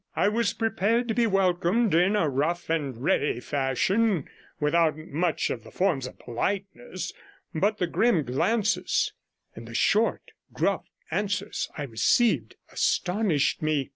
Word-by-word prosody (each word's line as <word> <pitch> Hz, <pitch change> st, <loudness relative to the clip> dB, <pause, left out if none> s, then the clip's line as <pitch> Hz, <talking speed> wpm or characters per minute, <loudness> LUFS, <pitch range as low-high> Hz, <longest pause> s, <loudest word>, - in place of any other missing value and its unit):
I -, -, +3 dB
was 230 Hz, 0 st, 0 dB
prepared 225 Hz, +1 st, 0 dB
to -, -, +2 dB
be 235 Hz, 0 st, +2 dB
welcomed 195 Hz, +2 st, +2 dB
in 180 Hz, +5 st, +4 dB
a 170 Hz, -7 st, +2 dB
rough 155 Hz, +5 st, -1 dB
and 145 Hz, -7 st, -1 dB
ready 140 Hz, -3 st, +1 dB
fashion, 150 Hz, -, 0 dB, 0.3 s
without 155 Hz, +1 st, +2 dB
much 160 Hz, +2 st, -1 dB
of 115 Hz, -, -5 dB
the -, -, -12 dB
forms 165 Hz, -9 st, 0 dB
of -, -, -12 dB
politeness, 185 Hz, -, -4 dB, 0.4 s
but 205 Hz, +6 st, +1 dB
the 180 Hz, -, +1 dB
grim 185 Hz, -1 st, +2 dB
glances 195 Hz, -, 0 dB, 0.4 s
and 115 Hz, +1 st, -10 dB
the 115 Hz, -, -9 dB
short, 215 Hz, -, +1 dB, 0.2 s
gruff -, -, 0 dB, 0.3 s
answers 205 Hz, 0 st, -2 dB
I 150 Hz, -, -3 dB
received 135 Hz, -, +1 dB, 0.2 s
astonished 180 Hz, -5 st, +1 dB
me. 155 Hz, -3 st, 0 dB
175 Hz, 140 wpm, -26 LUFS, 145-210 Hz, 0.4 s, in